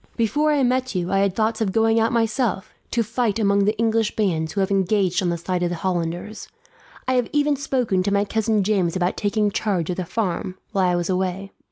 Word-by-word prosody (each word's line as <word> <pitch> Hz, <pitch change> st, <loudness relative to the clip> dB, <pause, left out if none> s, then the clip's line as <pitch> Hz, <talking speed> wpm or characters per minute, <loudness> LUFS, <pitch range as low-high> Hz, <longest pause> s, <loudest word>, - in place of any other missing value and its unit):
"Before 290 Hz, +7 st, +2 dB
I 290 Hz, -2 st, +2 dB
met 255 Hz, -2 st, 0 dB
you 180 Hz, -1 st, -1 dB
I 195 Hz, -, +2 dB
had 195 Hz, -1 st, +1 dB
thoughts 220 Hz, +1 st, 0 dB
of 205 Hz, -3 st, +1 dB
going 225 Hz, +2 st, +3 dB
out, 225 Hz, 0 st, +2 dB
myself, 225 Hz, -3 st, 0 dB, 0.2 s
to 235 Hz, -, +1 dB
fight 225 Hz, -1 st, -1 dB
among 200 Hz, -2 st, +2 dB
the 210 Hz, +1 st, +1 dB
English 225 Hz, -1 st, +1 dB
bands 165 Hz, -7 st, 0 dB
who 200 Hz, -, -2 dB
have 190 Hz, -, 0 dB
engaged 195 Hz, -1 st, +1 dB
on 180 Hz, -, 0 dB
the 170 Hz, -, -1 dB
side 180 Hz, +2 st, -2 dB
of 175 Hz, -, +1 dB
the 175 Hz, -, -3 dB
Hollanders. 175 Hz, +3 st, -3 dB, 0.6 s
I 260 Hz, -, +2 dB
had 250 Hz, -2 st, +1 dB
even 295 Hz, 0 st, +2 dB
spoken 255 Hz, -9 st, 0 dB
to 200 Hz, -, -1 dB
my 200 Hz, 0 st, +2 dB
cousin 220 Hz, -1 st, +1 dB
James 190 Hz, -4 st, +1 dB
about 180 Hz, 0 st, 0 dB
taking 205 Hz, 0 st, 0 dB
charge 190 Hz, -5 st, -1 dB
of 175 Hz, -, -4 dB
the 185 Hz, -, -2 dB
farm, 185 Hz, -1 st, -3 dB
while 190 Hz, -2 st, +2 dB
I 180 Hz, -, +2 dB
was 175 Hz, +1 st, -1 dB
away. 190 Hz, +1 st, -2 dB
200 Hz, 225 wpm, -22 LUFS, 185-225 Hz, 0.6 s, going